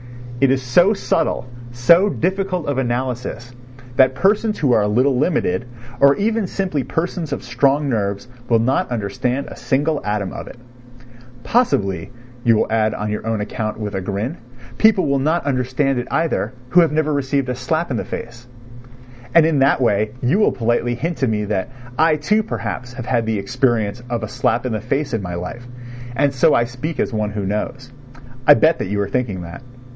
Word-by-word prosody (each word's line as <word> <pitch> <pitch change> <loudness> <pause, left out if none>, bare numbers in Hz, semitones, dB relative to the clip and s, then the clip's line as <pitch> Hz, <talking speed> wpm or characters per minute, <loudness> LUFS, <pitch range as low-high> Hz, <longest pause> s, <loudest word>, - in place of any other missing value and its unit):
It 135 - +4
is 130 0 +1
so 175 - +4
subtle, 165 -8 0 0.3
so 170 +12 +5
difficult 190 -2 -1
of 145 -2 -1
analysis, 125 -1 -3 0.4
that 130 0 +5
persons 210 +5 +2
who 140 -4 +1
are 110 - +4
a 105 - +1
little 125 +6 +2
limited, 125 - 0 0.3
or 140 +1 +6
even 220 0 0
simply 180 -8 -2
persons 165 +4 -3
of - - -3
strong 135 +4 +1
nerves, 100 -2 -2 0.2
will 115 - +5
not 120 +4 +1
understand 120 +4 -2
a - - -9
single 145 +2 0
atom 105 -2 -2
of - - -7
it. - - -11 0.9
"Possibly," 100 - +1 0.3
you 115 -1 +4
will 110 - 0
add 110 -1 +1
on 105 0 -3
your 105 +1 -4
own 110 -2 -1
account 110 0 -4
with 105 -1 -4
a 95 - -2
grin, 105 - -3 0.4
"people 220 -3 +5
will 140 0 +1
not 155 +4 0
understand 130 0 0
it 120 - -5
either 160 -8 0 0.2
who 180 - +5
have 165 - +2
never 155 0 +1
received 140 -1 0
a - - 0
slap 155 +6 -2
in 120 - 0
the - - -2
face," 120 +1 -7 0.9
and 165 -2 +7
in 160 -3 +2
that 135 +1 +4
way 105 -3 +1
you 140 +12 +2
will 215 - +4
politely 120 +1 0
hint 165 +7 -3
to 130 - +1
me 105 -2 -1
that 100 -2 -2 0.3
I, 160 0 +5
too, 205 +9 +1
perhaps, 125 - -5
have 125 -2 -7
had 120 -3 0
the 110 -1 0
experience 120 0 0
of 120 -1 -2
a - - -2
slap 115 +3 0
in 125 - -1
the 110 - -2
face 135 +4 -2
in 115 - 0
my 90 -2 -5
life, 90 +8 -6 0.5
and 140 +3 +2
so 150 +4 +4
I 120 - +4
speak 130 +7 -5
as 135 - -1
one 105 -1 -1
who 105 -1 -4
knows. 125 +6 -4 0.6
I 145 - +10
bet 160 +2 +3
that - - -2
you 100 +1 -2
are 100 - -1
thinking 105 -4 -2
that. 85 +10 -9
125 Hz, 195 wpm, -20 LUFS, 110-150 Hz, 0.9 s, I